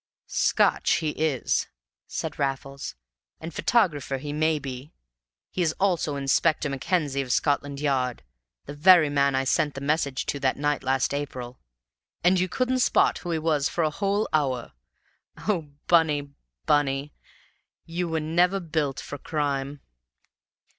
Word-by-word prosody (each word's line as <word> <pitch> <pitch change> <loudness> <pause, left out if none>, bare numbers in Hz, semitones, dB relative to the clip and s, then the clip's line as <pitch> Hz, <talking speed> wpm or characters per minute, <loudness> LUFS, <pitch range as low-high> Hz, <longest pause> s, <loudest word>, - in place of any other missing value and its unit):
"Scotch - - +2
he 155 - 0
is," 150 -5 0 0.4
said - - -5
Raffles, 135 0 -3 0.4
"and 165 +1 -7
photographer 150 - +1
he 145 +2 -5
may 155 +1 +2
be. 135 +1 -7 0.6
He 185 - -2
is 160 -3 +2
also 175 -6 +1
Inspector 140 +3 +2
Mackenzie 140 0 -1
of 130 -2 -4
Scotland 145 0 0
Yard 130 -4 0 0.4
the 145 - -7
very 155 0 +6
man 140 -1 +2
I 135 - +1
sent 140 +2 +1
the - - -4
message 140 -2 0
to 140 - -2
that 130 -1 +1
night 145 0 0
last 135 +1 0
April. 130 -4 -5 0.6
And 180 +1 +4
you 185 0 0
couldn't 255 +5 0
spot - - +3
who 175 - -7
he 165 - 0
was 155 -2 0
in 170 - +3
a 155 - +1
whole 200 +5 0
hour! 130 -6 0 0.8
O 170 -8 0 0.2
Bunny, 150 -4 +3 0.3
Bunny, 145 0 +1 0.7
you 170 +1 -3
were 160 0 0
never 175 +5 +2
built 155 -7 -2
for 145 +4 -7
crime!" 140 -2 -2
145 Hz, 145 wpm, -26 LUFS, 140-165 Hz, 0.8 s, very